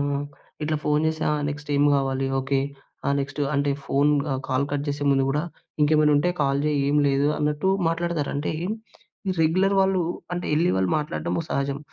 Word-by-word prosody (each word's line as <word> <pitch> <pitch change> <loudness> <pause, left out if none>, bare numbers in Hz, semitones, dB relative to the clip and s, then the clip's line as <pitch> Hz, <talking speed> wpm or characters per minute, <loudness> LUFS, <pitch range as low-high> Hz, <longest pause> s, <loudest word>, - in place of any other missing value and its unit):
ఆ! - - 0 0.5
ఇట్లా 155 +1 0
ఫోన్ 150 +1 +2
చేసి 160 0 -2
ఆ - - +2 0.2
నెక్స్ట్ 145 0 -7
ఏం 140 - +3
కావాలి, 135 -1 0
ఓకే, 135 +1 0 0.5
ఆ - - +3
నెక్స్ట్ 140 +1 -4
అంటే 140 0 +1
ఫోన్ 140 +2 +2 0.2
ఆహ్, 130 0 -2
కాల్ 130 +1 +1
కట్ 145 -1 -1
చేసే 145 0 -2
ముందు 135 -1 +3
కూడా 150 +3 0 0.4
ఇంకేమైనా 150 0 +4
ఉంటే 145 +5 +2
కాల్ 140 0 +2
చేయి 150 -1 +1
ఏం 145 +1 +2
లేదు 140 +1 +2
అన్నట్టు 150 +5 0 0.2
మాట్లాడతారు. 165 -3 -1
అంటే, 145 +1 -1 0.8
ఈ - - +2
రెగ్యులర్ 185 +5 +3
వాళ్ళు 190 -1 +2 0.3
అంటే 175 - -3
వెళ్లి 165 +4 +3
వాళ్ళు 95 -1 +1
మాట్లాడడం 150 0 -2
సహజం. 140 0 -1
145 Hz, 180 wpm, -24 LUFS, 140-155 Hz, 0.8 s, ఇంకేమైనా